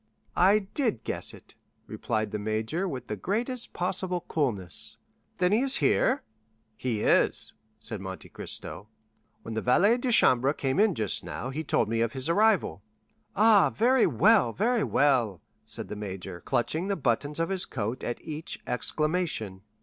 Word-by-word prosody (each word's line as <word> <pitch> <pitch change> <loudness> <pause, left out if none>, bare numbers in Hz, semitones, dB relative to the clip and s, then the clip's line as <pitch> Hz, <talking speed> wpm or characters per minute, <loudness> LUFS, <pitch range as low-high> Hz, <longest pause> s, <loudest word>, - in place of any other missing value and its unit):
"I 195 +4 +5 0.2
did 240 - +1
guess - - -1
it," - - -13 0.3
replied 110 -2 -3
the 105 - -3
major 110 - -2
with 130 -8 -5
the 105 - -4
greatest 235 - -3
possible 180 0 -2
coolness. 110 - -2 0.4
"Then 180 0 +2
he 215 - +4
is 270 0 +2
here?" 265 +3 +2 0.5
"He 110 -2 -2
is," - - +3 0.3
said 110 -2 -5
Monte 95 -1 -7
Cristo; 100 - -6 0.6
"when 115 - -6
the 110 - -2
valet 200 - +3
de 245 0 -1
chambre 130 - +4
came 135 +3 -1
in 210 -4 +3
just 110 -3 +1
now, 130 - -5
he 155 +4 -4
told 140 - +1
me 115 +1 -1
of 115 0 0
his 130 0 -1
arrival." 195 - +2 0.5
"Ah, 210 -1 +5
very 245 +2 +3
well, 120 -2 +4
very 230 +2 +1
well," 120 - +2 0.3
said - - -5
the - - -6
major, 95 -3 -7
clutching 155 +10 -1
the 200 - 0
buttons 145 +3 -1
of 165 - 0
his 190 -1 +2
coat 115 0 -4
at 120 - -3
each 155 +1 -5
exclamation. 150 - -2
140 Hz, 160 wpm, -27 LUFS, -, 0.6 s, I